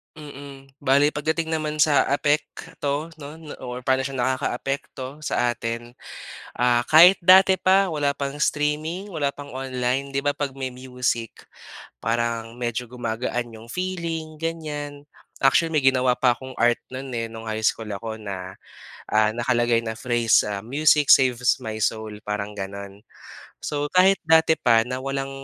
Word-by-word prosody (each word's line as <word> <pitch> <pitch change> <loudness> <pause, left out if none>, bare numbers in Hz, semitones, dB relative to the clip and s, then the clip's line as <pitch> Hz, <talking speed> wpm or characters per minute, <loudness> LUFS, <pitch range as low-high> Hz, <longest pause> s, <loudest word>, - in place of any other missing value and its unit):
Mm, 140 -2 -11
bale 140 +2 +3
pagdating 160 +2 -2
naman 155 -1 -2
sa 150 -2 +4
apekto 145 +1 -1
no 145 +2 -8 0.3
or 125 0 -6
paano 130 -1 +2
siya 135 - -7
nakakaapekto 130 +2 -3
sa 120 -5 0
atin, 115 +1 -5 0.7
ah, 120 0 +3
kahit 175 +5 +8
dati 190 +2 +7
pa 190 +1 +4
wala 145 -2 0
pang 140 -1 -3
streaming, 155 +7 -1
wala 145 -3 0
pang 145 0 -10
online, 130 +1 -2
'di 140 - 0
ba, 145 - +3
'pag 140 -2 -4
may 130 -1 -4
music, 125 -2 -3 0.6
parang 115 0 -1
medyo 120 0 -3
gumagaan 120 0 -3
'yong 110 +1 -12
feeling 170 -4 -4
ganyan. 150 -3 -5 0.4
Actually, 160 +4 +3
may 150 - +4
ginawa 130 -1 +4
pa 125 -2 +4
akong 130 +2 -9
art 120 0 +4
no'n, 130 +1 -6
eh, 115 - -1
no'ng 115 0 -9
high 110 0 -3
school 110 0 0
ako 110 +2 -5
na, 95 -2 -6 0.5
ah, 110 0 +3
nakalagay 120 -1 +1
na 110 -1 -4
phrase, 120 -2 +3 0.2
Music 150 +2 +3
saves 125 -2 +2
my 110 -1 -5
soul, 110 0 -1 0.2
parang 105 0 -3
gano'n. 100 +1 -7 0.6
So, 145 0 -2
kahit 190 +2 +5
dati 160 0 +4
pa 115 -3 +4
na 125 +1 -4
walang 135 0 -3
130 Hz, 150 wpm, -23 LUFS, 120-150 Hz, 0.7 s, kahit